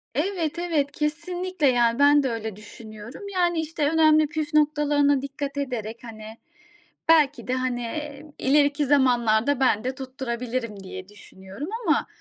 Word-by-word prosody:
Evet, 335 0 -1
evet, 310 -5 0
kesinlikle, 340 +2 -2
yani, 240 0 +2
ben 290 0 +5
de 260 - 0
öyle 220 -2 -4
düşünüyorum. 215 - -11
Yani, 350 -2 +1
işte 310 -2 -1
önemli 310 -1 +4
püf 305 0 -4
noktalarına 295 -2 +3
dikkat 280 0 -5
ederek, 235 -5 -4
hani, 220 -1 -10 0.7
belki 295 -6 +4
de, 255 - -1
hani, 250 -2 -2 0.5
ileriki 290 +1 +3
zamanlarda 250 -2 +3
ben 225 -5 +2
de 255 +1 -3
tutturabilirim 250 -4 -4
diye 185 0 -9
düşünüyorum 200 - -10 0.2
ama - - +2
275 Hz, 135 wpm, -24 LUFS, 235-300 Hz, 0.7 s, ben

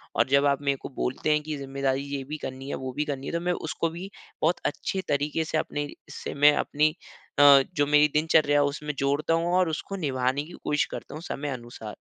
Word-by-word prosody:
और - - +3
जब 140 +1 +4
आप 140 0 +1
मेरे 140 -1 +1
को - - -6
बोलते 130 +4 -1
हैं 150 0 +3
कि 155 -1 -4
ज़िम्मेदारी 135 0 -1
ये 135 - -3
भी 150 +3 -6
करनी 135 +1 -6
है, - - -2
वो 130 -1 -5
भी 150 +2 -1
करनी 140 -2 -4
है - - -4
तो 170 - +1
मैं 180 0 0
उसको 165 0 -2
भी 175 +4 -7 0.3
बहुत 170 +2 +2
अच्छे 190 +5 -2
तरीक़े 145 +3 0
से 155 - -1
अपने 145 -1 -3 0.2
से - - -6
मैं 145 +1 +6
अपनी 150 +1 +2 0.5
अ, 140 -1 +9
जो 145 -1 +3
मेरी 150 0 +5
दिनचर्या 150 -1 +4
है। - - +3
उसमें 150 +1 -4
जोड़ता 145 +4 +1
हूँ 170 +1 +1
और 185 -2 +3
उसको 160 +5 -4
निभाने 135 -4 0
की 170 - -12
कोशिश 150 0 +1
करता - - -8
हूँ 155 - -7
समय 145 -2 -4
अनुसार। 120 -4 -7
145 Hz, 230 wpm, -26 LUFS, 140-155 Hz, 0.5 s, अ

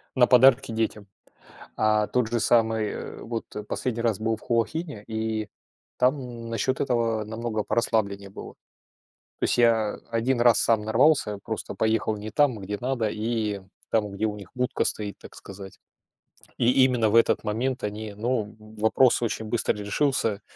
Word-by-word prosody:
на 125 -2 +6
подарки 125 -2 +5
детям. 110 -2 -2 0.7
А 110 -1 +2
тот 125 -3 0
же 120 0 0
самый, 110 -2 +2
э-э, - - -7
вот 115 -1 -4 0.2
последний 120 -2 -2
раз 115 -4 0
был 110 +1 0
в - - -17
Хуахине, 120 +1 -2
и 110 -1 -3 0.5
там 125 -3 -1
насчет 115 +4 -1
этого 115 -4 0
намного 110 0 -3
порасслабленнее 100 -4 -1
было. 95 - -10 0.9
То - - -2
есть - - +1
я 115 -3 +3 0.2
один 120 +2 0
раз 120 -1 +5
сам 115 -2 +3
нарвался, 110 -2 +2
просто 110 -2 -5
поехал 110 -1 0
не 105 +1 -7
там, 140 -4 +2
где 100 +1 -5
надо, 125 -3 -1
и 110 -2 -2 0.3
там, 105 -2 +1
где 100 +2 -4
у 105 - -2
них 100 -3 -11
будка 125 -1 -1
стоит, 105 -1 -1
так - - -14
сказать. 95 0 -11 0.8
И 120 +1 +3
именно 125 -4 +2
в - - -2
этот 115 - +3
момент 120 +4 -2
они 105 0 -5
ну, 110 -1 -2
в 110 0 -14
вопрос 120 +3 +3
очень 110 -1 -2
быстро 115 +2 0
решился 105 0 0
110 Hz, 160 wpm, -25 LUFS, 105-120 Hz, 0.9 s, на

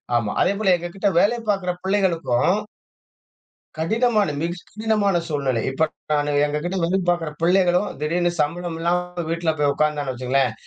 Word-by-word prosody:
ஆமா. 115 -3 +1
அதேபோல 195 +1 +2
எங்க 175 0 -5
கிட்ட 195 - 0
வேலை 230 +6 +3
பார்க்கற 195 -3 -2
பிள்ளைகளுக்கும் 185 -5 +1 1.2
கடினமான 215 +2 +1
மிக 170 +1 -1 0.2
கடினமான 210 -3 +1
சூழ்நிலை. 135 -6 -1
இப்ப 160 +4 +1 0.3
நானு 145 0 +1
எங்க 150 0 -2
கிட்ட 175 +2 -2
வேலை 180 +3 +1
பார்க்கற 175 -3 0
பிள்ளைகளும் 180 +2 +3
திடீர்னு 175 +3 +1
சம்பளம் 170 +2 -2
இல்லாம 175 +1 -1
வீட்ல 165 -1 0
போய் 145 -1 +3
உட்கார்ந்தான்னு 150 -2 0
வச்சுக்கோங்களேன் 130 0 0
175 Hz, 140 wpm, -22 LUFS, 150-190 Hz, 1.2 s, வேலை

